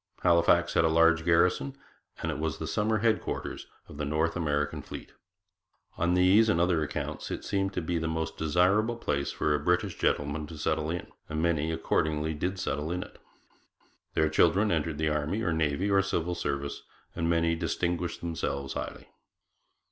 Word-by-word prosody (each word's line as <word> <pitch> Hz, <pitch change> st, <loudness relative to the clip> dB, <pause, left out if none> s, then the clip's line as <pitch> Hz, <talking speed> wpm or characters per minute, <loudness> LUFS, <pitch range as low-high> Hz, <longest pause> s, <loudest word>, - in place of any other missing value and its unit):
Halifax 85 Hz, 0 st, +4 dB
had 85 Hz, -, +4 dB
a -, -, +4 dB
large 85 Hz, 0 st, +4 dB
garrison, 85 Hz, -5 st, +2 dB, 0.5 s
and -, -, 0 dB
it -, -, -5 dB
was 80 Hz, -1 st, -2 dB
the -, -, -5 dB
summer 110 Hz, +1 st, +1 dB
headquarters 110 Hz, -1 st, -1 dB, 0.2 s
of -, -, -11 dB
the 75 Hz, -, -3 dB
North 75 Hz, +3 st, 0 dB
American 75 Hz, -4 st, -1 dB
fleet. -, -, -9 dB, 0.8 s
On 85 Hz, +2 st, +1 dB
these 95 Hz, +5 st, +5 dB
and 85 Hz, -, +2 dB
other 85 Hz, -2 st, +2 dB
accounts 75 Hz, 0 st, -4 dB
it -, -, -5 dB
seemed 95 Hz, -1 st, 0 dB
to 90 Hz, -, -2 dB
be 85 Hz, +1 st, -1 dB
the 80 Hz, -, -2 dB
most 80 Hz, 0 st, -2 dB
desirable 90 Hz, +9 st, +2 dB
place 70 Hz, -11 st, -2 dB
for 75 Hz, -, 0 dB
a 75 Hz, -, +1 dB
British 90 Hz, +1 st, +1 dB
gentleman 75 Hz, +1 st, 0 dB
to 80 Hz, -, -9 dB
settle 75 Hz, +1 st, -1 dB
in, 85 Hz, +1 st, -3 dB, 0.2 s
and 75 Hz, -, -2 dB
many 80 Hz, -1 st, +1 dB
accordingly 80 Hz, -1 st, 0 dB
did 90 Hz, +5 st, -2 dB
settle 80 Hz, -3 st, -2 dB
in 90 Hz, +1 st, -2 dB
it. -, -, -16 dB, 1.0 s
Their 80 Hz, -, +3 dB
children 85 Hz, +7 st, +3 dB
entered 80 Hz, -2 st, -1 dB
the 80 Hz, 0 st, +1 dB
Army 75 Hz, +9 st, -1 dB
or 85 Hz, -, +1 dB
Navy 80 Hz, +5 st, 0 dB
or 100 Hz, 0 st, +5 dB
Civil 90 Hz, -3 st, -1 dB
Service, 70 Hz, -4 st, -3 dB, 0.3 s
and 85 Hz, 0 st, -1 dB
many 85 Hz, 0 st, +2 dB
distinguished 85 Hz, +1 st, -2 dB
themselves 70 Hz, -5 st, -3 dB
highly. -, -, -6 dB
85 Hz, 175 wpm, -29 LUFS, 75-90 Hz, 1.0 s, these